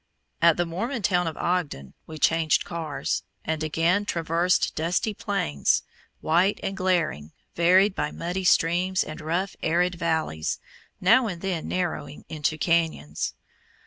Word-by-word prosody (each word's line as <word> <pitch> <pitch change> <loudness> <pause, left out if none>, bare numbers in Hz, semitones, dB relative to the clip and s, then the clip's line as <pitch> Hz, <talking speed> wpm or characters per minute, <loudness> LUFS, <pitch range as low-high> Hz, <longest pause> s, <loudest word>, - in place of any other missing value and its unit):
At 170 -1 +5
the 175 - +1
Mormon 220 +8 -3
town 180 -2 +2
of 160 - -4
Ogden 160 - -2
we 160 - -8
changed 160 0 +2
cars, 160 -4 -3 0.2
and 160 0 -2
again 165 +5 +1
traversed 170 0 +1
dusty 175 +7 0
plains, 135 - 0 0.4
white 175 +6 +2
and 195 - -2
glaring, 170 - 0 0.2
varied 185 +4 +4
by 150 -5 -1
muddy 180 +4 -4
streams 180 +2 +3
and 155 +1 -8
rough, 175 +5 -2
arid 175 +3 +2
valleys, 160 - -1 0.4
now 230 +7 +5
and 180 -5 -4
then 180 -4 -2
narrowing 170 -5 -3
into 155 0 -1
canyons. 160 - 0
170 Hz, 135 wpm, -25 LUFS, 155-185 Hz, 0.4 s, At